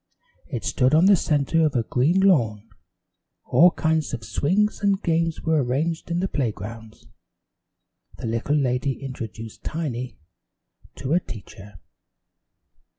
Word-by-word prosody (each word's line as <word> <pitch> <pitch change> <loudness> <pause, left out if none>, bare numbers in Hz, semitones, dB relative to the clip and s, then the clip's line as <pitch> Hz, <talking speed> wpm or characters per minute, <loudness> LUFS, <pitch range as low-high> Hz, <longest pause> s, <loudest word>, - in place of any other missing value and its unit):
It 125 -7 -5
stood 130 +3 +2
on 165 +4 +5
the 200 0 +7
center 160 0 +1
of 150 -3 +1
a 120 - +2
green 150 +12 +2
lawn. 115 - +2 0.8
All 175 - +6
kinds 160 -4 0
of 115 - -10
swings 200 - 0
and 200 -1 +2
games 165 -2 0
were 160 -3 +2
arranged 155 +8 -2
in 170 +1 0
the 190 - 0
playgrounds. 110 - -5 1.1
The - - -7
little 115 +6 -1
lady 135 0 0
introduced 115 -4 -8
Tiny 130 -6 -4 0.8
to 135 - -5
her 170 - +4
teacher. 105 - -11
140 Hz, 130 wpm, -24 LUFS, 115-165 Hz, 1.1 s, the